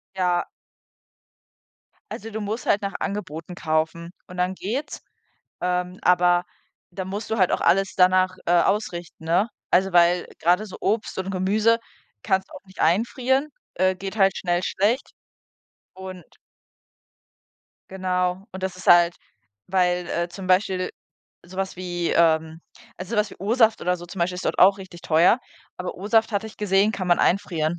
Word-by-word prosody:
Ja. 180 -2 +1 1.7
Also 225 +2 -7
du 220 - -5
musst 215 +3 -4
halt 205 - +2
nach 200 - -3
Angeboten 180 -4 -5
kaufen 160 +1 -1 0.2
und 180 - -11
dann 180 +1 0
geht's. 235 +11 -4 0.6
Ähm, 180 +1 -1
aber 180 0 +4 0.5
da 185 +1 -5
musst 200 +4 -5
du 220 - 0
halt 185 - +3
auch - - 0
alles 195 +3 +2
danach, 185 0 +4
äh, 175 - +2
ausrichten, 175 -5 -2
ne? 180 +7 +2 0.2
Also 190 +1 +3
weil 175 0 +4
grade 180 +6 +2
so 190 - -9
Obst 220 +1 -1
und 190 +1 -3
Gemüse 210 +5 +2 0.4
kannst 190 -2 0
du - - -13
auch - - -11
nicht 190 - -12
einfrieren, 250 - +1 0.3
äh, 185 +1 +2
geht 195 +3 -6
halt 195 -1 +4
schnell 175 -1 0
schlecht 210 +8 0 0.8
und 185 -1 -9 1.7
Genau. 185 0 -1
Und 190 - -8
das 190 -1 -3
ist 185 - -11
halt 175 0 +6 0.5
weil, 180 -1 +1
äh, 170 +1 -1
zum 185 +2 -8
Beispiel 185 0 +1 0.5
so 185 +1 -13
was 190 -1 -3
wie, 175 -2 -3
ähm 160 -1 +2 0.4
ah, 185 - -5
so 210 +4 -5
was 210 0 +1
wie - - -12
O-Saft 225 +2 +2
oder 180 +1 0
so 175 - -10
zum 180 +3 -10
Beispiel 175 +1 0
ist 180 - -6
dort - - -1
auch 195 +2 +6
richtig 185 -3 -11
teuer. 170 +9 +4 0.4
Aber 180 - -5
O-Saft, 220 +4 +1
hatte 205 +2 -1
ich 220 - -12
gesehen, 205 +1 +2
kann 185 -4 -4
man 175 - +4
einfrieren. 175 -3 +1
185 Hz, 165 wpm, -24 LUFS, 175-200 Hz, 1.7 s, halt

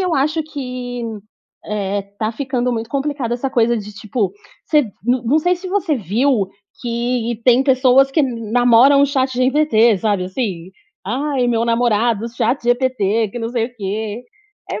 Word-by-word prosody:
eu 365 -2 0
acho 305 +4 +1
que, 250 -5 -6 0.6
eh, 200 -1 -2 0.2
tá 220 +1 -1
ficando 250 -1 -2
muito 225 0 -4
complicado 275 -4 -2
essa 250 +3 -1
coisa 235 -2 +2
de, 210 -1 -6
tipo, 205 -2 -2 0.3
se 300 -2 +4 0.2
não 245 0 +1
não 280 +7 +3
sei 355 +3 +2
se 370 +1 -8
você 380 -5 0
viu, 220 - +1 0.3
que 235 -1 -2
tem 250 +1 +5
pessoas 265 0 +4
que 305 - +2
namoram 245 +2 +4
o - - +5
ChatGPT, 260 -4 +2
sabe 205 -4 0
assim? 185 -3 -4 0.4
"Ai, 265 +2 -1
meu 230 -1 +1
namorado 230 -1 +1
ChatGPT 240 -3 0
que 240 - -6
não 230 -1 -3
sei 235 -2 0
o 245 - -16
quê". 215 +3 -4 0.5
É - - -3
245 Hz, 155 wpm, -18 LUFS, 225-270 Hz, 0.6 s, tem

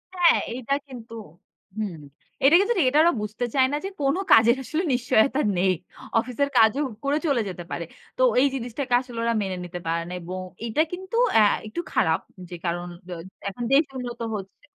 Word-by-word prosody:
হ্যাঁ, 345 -2 +5 0.2
এইটা 255 +2 -2
কিন্তু 235 -3 -10 0.6
হুম, 205 -6 -3 0.5
এটা 290 +5 +7
কিন্তু 405 +4 +2
ঠিক 285 - +4
এটা 295 +3 +3
ওরা 345 - +4
বুঝতে 215 +4 -3
চায় 260 -1 +5
না 295 - 0
যে, - - -2
কোন 275 +3 +2 0.2
কাজের 230 +2 +7
আসলে 320 +7 -2
নিশ্চয়তা 250 +2 +2 0.2
নেই। 185 +1 +3 0.5
অফিসের 255 +4 -1
কাজও 225 +6 +5 0.2
করে 285 +2 +1
চলে 260 -5 +2
যেতে 175 -1 -7
পারে। 170 - -3 0.3
তো - - -1 0.2
এই 280 - +5
জিনিসটাকে 250 +1 -4
আসলে 245 -3 -10
ওরা 235 0 +1
মেনে 190 -2 -3
নিতে 175 0 -6
পারে 165 0 0
না। - - -6
এবং 185 +2 -6 0.3
এটা 235 +7 +1
কিন্তু 375 +4 -6 0.2
অ্যাঁ 215 -2 +6
একটু 290 +11 -4
খারাপ 160 0 +2 0.3
যে, 175 - -6
কারণ 175 +1 -2 0.2
দ - - -13 0.4
এখন 240 +5 -6
দেশ 295 +4 +6
উন্নত 245 -2 -6 0.2
হচ্ছে। 195 +8 -9
240 Hz, 185 wpm, -25 LUFS, 200-280 Hz, 0.6 s, এটা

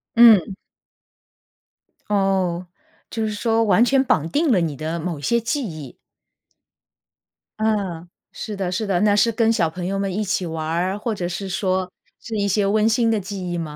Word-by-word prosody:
嗯。 220 -5 +6 1.5
哦， 190 -3 0 0.4
就 225 -1 -3
是 215 - -2
说 225 +1 +1
完 210 +2 +4
全 265 +1 +3
绑 160 - +1
定 300 - +1
了 185 -6 +3
你 160 -3 -2
的 160 +4 -4
某 165 -3 -4
一 - - -11
些 235 +8 +1
记 265 +4 -2
忆。 155 -6 -9 1.6
嗯， 195 -6 -1 0.2
是 215 -2 -6
的 190 -2 -3
是 210 +3 -2
的。 185 -1 +1
那 210 -1 +4
是 230 +2 +3
跟 225 0 +2
小 170 -8 +1
朋 175 +2 -6
友 195 +1 -2
们 195 -2 -2
一 215 - 0
起 190 -2 -1
玩 160 -1 -4
儿， 180 +5 -1
或 220 +1 -3
者 180 -4 -3
是 190 +2 -5
说 185 -1 -1 0.3
是 225 -2 -5
一 200 0 0
些 200 +1 +1
温 215 +2 +2
馨 230 0 +2
的 215 - +1
记 190 -2 -5
忆 175 - -2
吗？ 155 -3 -5
195 Hz, 200 characters per minute, -21 LUFS, 175-220 Hz, 1.6 s, 嗯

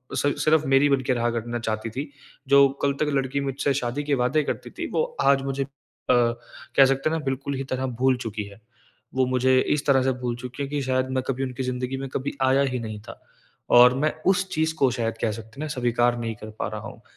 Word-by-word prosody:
सि 145 0 +1
सिर्फ़ 155 0 +3
मेरी 135 +2 +4
बन 135 -1 +2
के 130 - +3
रहा 120 0 0
करना 120 +1 -3
चाहती 110 0 -3
थी, 140 +5 -6 0.4
जो 140 0 +7 0.2
कल 140 0 +3
तक 150 - +2
लड़की 135 0 0
मुझसे 140 +1 -1
शादी 130 +2 -2
के 145 -1 +1
वादे 130 +5 +1
करती - - -4
थी, - - -5
वो 470 - +1 0.2
आज 140 -1 +4
मुझे 135 0 -2
अ, - - -10 0.4
कह 120 +2 +2
सकते 135 +3 +1
हैं 160 - 0
ना, 155 - -6
बिल्कुल 135 +1 -2
ही 135 - -3
तरह 130 +1 -1 0.2
भूल 130 -1 +4
चुकी 110 -3 -4
है। 100 +1 -13 0.6
वो 130 -1 +3
मुझे 130 0 +3 0.2
इस 145 - -4
तरह 135 -2 +5
से 135 - +2
भूल 120 -1 -2
चुकी 125 +3 -6
है - - -3
कि 145 -1 -2
शायद 130 0 0
मैं 130 - 0
कभी 135 0 -1
उनकी 130 0 -4
ज़िंदगी 125 +1 -3
में 135 0 -4
कभी 140 +1 -2
आया 135 +1 +4
ही 125 - -1
नहीं 110 -2 -6
था - - -10 0.6
और 125 +1 +7
मैं 155 +2 +1
उस 190 0 +3
चीज़ 160 +1 +1
को, 135 -5 +2
शायद 115 -2 -2
कह 110 - +1
सकते 110 0 -8
हैं - - -2
ना, - - -4
स्वीकार 120 -3 +1
नहीं 115 -1 -3
कर 110 +1 -10
पा - - -1
रहा 105 0 -6
हूँ - - -12
130 Hz, 240 wpm, -24 LUFS, 120-140 Hz, 0.6 s, जो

